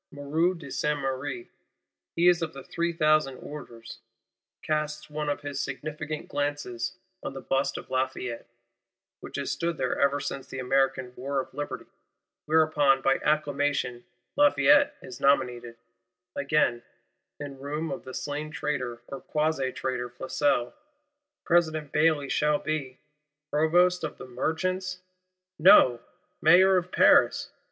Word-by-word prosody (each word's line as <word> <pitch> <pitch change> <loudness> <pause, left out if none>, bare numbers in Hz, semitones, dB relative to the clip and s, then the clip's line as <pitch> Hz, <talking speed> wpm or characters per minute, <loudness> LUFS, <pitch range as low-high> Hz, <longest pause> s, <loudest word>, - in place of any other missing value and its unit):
Moreau 155 +5 0
de 145 -6 -10
Saint 150 0 0
Méry, 130 -2 -4 0.7
he 170 +1 +3
of 170 -2 +3
the 135 -1 -9
"three 170 0 -2
thousand 155 -5 +2
orders," 115 -6 -10 0.6
casts 155 0 -2
one 150 0 -3
of 145 - -2
his 145 -1 -5
significant 150 +2 -5
glances 145 -1 -3 0.2
on - - -5
the - - -5
Bust 135 +1 -1
of - - -10
Lafayette, 130 -2 -2 0.7
which - - -10
has 140 -1 -2
stood 170 -1 -2
there 130 -2 -1
ever 140 0 +2
since 135 -1 -5
the - - -8
American 130 -1 0
War 135 +2 -2
of 130 - -6
Liberty. 145 +2 -5 0.6
Whereupon, 150 -4 +3
by 135 - +3
acclamation, 145 -4 0 0.3
Lafayette 290 0 +5
is 125 -1 -9
nominated. 125 -4 +1 0.6
Again, 140 -4 +1 0.6
in 140 -2 -7
room 150 +4 -4
of 180 - -5
the 130 - -8
slain 145 +1 -4
traitor 125 -6 -3
or 135 - -7
quasi 150 -4 -1
traitor 125 -2 -3
Flesselles, 130 0 0 0.7
President 155 -4 +1
Bailly 155 -3 +2
shall 150 +2 +2
be—Provost 150 +4 -1
of 155 - -4
the - - -9
Merchants? 185 +8 -2 0.6
No: 130 -7 +7 0.4
Mayor 185 +4 +6
of 180 0 -2
Paris! - - +4
145 Hz, 130 wpm, -27 LUFS, 135-155 Hz, 0.7 s, No